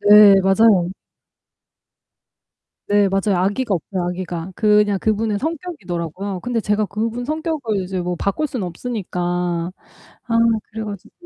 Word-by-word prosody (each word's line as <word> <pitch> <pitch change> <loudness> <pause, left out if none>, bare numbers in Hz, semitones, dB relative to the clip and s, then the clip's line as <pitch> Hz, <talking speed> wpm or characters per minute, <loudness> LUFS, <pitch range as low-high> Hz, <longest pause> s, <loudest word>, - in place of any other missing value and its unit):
네, 205 -1 +8
맞아요. 195 -2 +4 2.0
네, 205 -1 +4
맞아요. 195 -1 +1
악의가 205 +4 0
없어요 185 +2 -3
악의가. 180 0 -5
그냥 210 -2 +3
그분의 215 0 0
성격이더라고요. 195 - -4
근데 245 -2 -1
제가 210 0 +1
그분 225 +5 -3
성격을 305 - -2
이제 185 0 -3
뭐 175 0 -2
바꿀 200 - -1
수는 245 -9 -4
없으니까 190 0 -5
아 175 0 -2 0.8
그래 220 0 -5
가지고 200 -3 -8
205 Hz, 295 characters per minute, -20 LUFS, 180-225 Hz, 2.0 s, 네